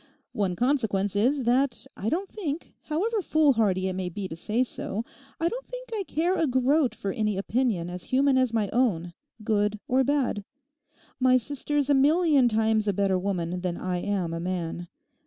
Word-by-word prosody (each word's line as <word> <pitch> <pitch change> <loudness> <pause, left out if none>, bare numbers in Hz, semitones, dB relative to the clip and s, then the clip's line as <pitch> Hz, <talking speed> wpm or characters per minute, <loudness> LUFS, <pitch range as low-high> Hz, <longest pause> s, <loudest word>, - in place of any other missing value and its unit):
One 195 -4 0
consequence 220 -6 0
is 255 +7 +2
that 250 +1 +1
I 210 - -2
don't 370 +8 -1
think, 340 -6 -5
however 410 +8 0
foolhardy 225 - +2
it 190 - -2
may 185 -1 -3
be 190 +2 -5
to - - -6
say 215 +9 0
so, 230 -2 -4 0.3
I 330 - +2
don't - - -4
think - - -8
I 430 - -1
care 340 +4 +1
a 330 -4 +1
groat 260 +2 +2
for 195 - -3
any 210 -3 -1
opinion 210 -4 0
as 180 0 -6
human 270 +1 +3
as 255 -2 +2
my 220 -3 +1
own, 185 -9 +1 0.3
good 210 -1 +1
or 260 +1 +3
bad. 265 -7 0 0.8
My 255 0 +5
sister's 285 +3 -1
a 290 - +4
million 290 -1 +4
times 220 -1 +1
a 205 - +2
better 190 -1 +1
woman 180 -2 -2
than 175 -1 -2
I 185 -1 -2
am 180 -3 -2
a 165 - -3
man. 175 -1 -3
230 Hz, 180 wpm, -26 LUFS, 195-280 Hz, 0.8 s, My